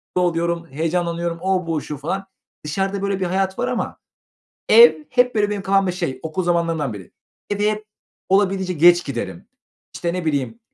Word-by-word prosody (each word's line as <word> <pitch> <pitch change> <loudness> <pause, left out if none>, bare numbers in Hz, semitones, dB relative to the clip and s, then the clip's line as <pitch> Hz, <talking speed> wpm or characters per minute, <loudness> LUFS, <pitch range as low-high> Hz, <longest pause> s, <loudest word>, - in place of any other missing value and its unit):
oluyorum, 170 -1 0
heyecanlanıyorum, 170 +2 -2
o, 185 -2 0
bu, 160 -3 -1
şu 150 - -6
falan. 190 +8 -3 0.4
Dışarıda 195 +5 -2
böyle 200 -1 -1
bir 190 - 0
hayat 190 +1 -1
var - - 0
ama - - -3 0.7
ev 470 -9 +7
hep 250 -1 +2
böyle 205 -1 +1
benim 205 -2 -3
kafamda 195 -1 +2
şey, 170 -8 -3
okul 160 +4 -3
zamanlarından 165 -6 0
biri. 100 -4 -10 0.4
Eve 205 +1 +1
hep 215 0 -4 0.4
olabildiğince 190 -1 +2
geç 175 +1 +5
giderim, 130 -4 -5 0.5
işte, 170 0 -2
ne 180 -2 -3
bileyim, 150 - -2
180 Hz, 160 wpm, -21 LUFS, 165-195 Hz, 0.7 s, ev